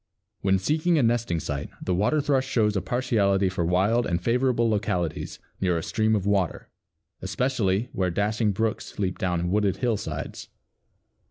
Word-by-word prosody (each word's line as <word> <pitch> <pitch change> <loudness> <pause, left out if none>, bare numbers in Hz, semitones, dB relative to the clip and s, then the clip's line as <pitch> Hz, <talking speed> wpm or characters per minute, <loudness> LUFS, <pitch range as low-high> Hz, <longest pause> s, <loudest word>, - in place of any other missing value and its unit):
When 95 -1 +3
seeking 155 - +1
a 145 - +3
nesting 115 -7 +1
site 75 -1 -4
the 90 - -2
Water 105 +12 +2
thrush 135 -2 +1
shows 105 -5 +1
a 95 - +1
partiality 100 -5 +1
for 90 -2 -2
wild 100 +8 +2
and 85 -2 0
favorable 120 +3 +1
localities 90 -7 -1 0.2
near 90 -3 +2
a 80 - -3
stream 110 +6 +1
of 100 -3 -1
water, 100 -4 0 0.5
especially 105 +1 0
"where 95 -1 0
dashing 105 +4 0
brooks 110 +2 -2
leap 95 -3 -2
down 90 -3 -1
wooded 100 -2 +1
hillsides." 100 - -3
100 Hz, 155 wpm, -25 LUFS, 90-115 Hz, 0.5 s, When